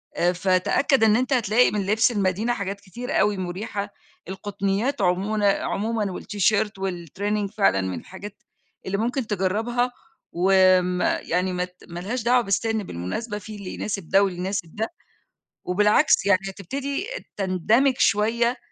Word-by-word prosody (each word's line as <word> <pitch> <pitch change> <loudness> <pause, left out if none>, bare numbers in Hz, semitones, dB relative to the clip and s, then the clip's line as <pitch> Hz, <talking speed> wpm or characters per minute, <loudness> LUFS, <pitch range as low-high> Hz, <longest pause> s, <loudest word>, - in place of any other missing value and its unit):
آآ 175 +1 +2
فتأكّد 190 - +2
إن 215 -1 +5
أنت 255 +3 +1
هتلاقي 235 -1 +3
من 205 -2 -1
لبس 220 +4 +3
المدينة 205 +2 0
حاجات 200 -2 -4
كتيرة 240 +6 -6
أوي 210 -2 +2
مريحة، 200 +3 -4 0.4
القطنيات 200 +6 -2
عمون 195 +3 +1
عمومًا 210 +1 0
والتيشيرت 205 +2 0
والtraining 195 +3 -3
فعلًا 100 - +3
من 95 -1 -3
الحاجات 200 +2 -11 0.4
اللي 195 +1 -1
ممكن 235 +2 -1
تجرّبها، 220 +6 0 0.4
وآمم 185 0 +3
يعني 180 +2 0
مات 180 0 -4
ما 170 0 -6
لهاش 220 +6 -3
دعوة 245 +2 +4
بالسن 220 +1 0
بالمناسبة 195 - -4
في 210 +1 -9
اللي 200 -2 -7
يناسب 195 -5 -4
ده 195 - +5
واللي 185 -3 -2
يناسب 180 -3 -3
ده، 220 +2 -1 0.8
وبالعكس 210 +7 +3
يعني 200 -2 +4
هتبتدي 275 - -4 0.3
تندمج 210 +8 +2
شوية، 235 +4 +2
200 Hz, 140 wpm, -24 LUFS, 185-225 Hz, 0.8 s, إن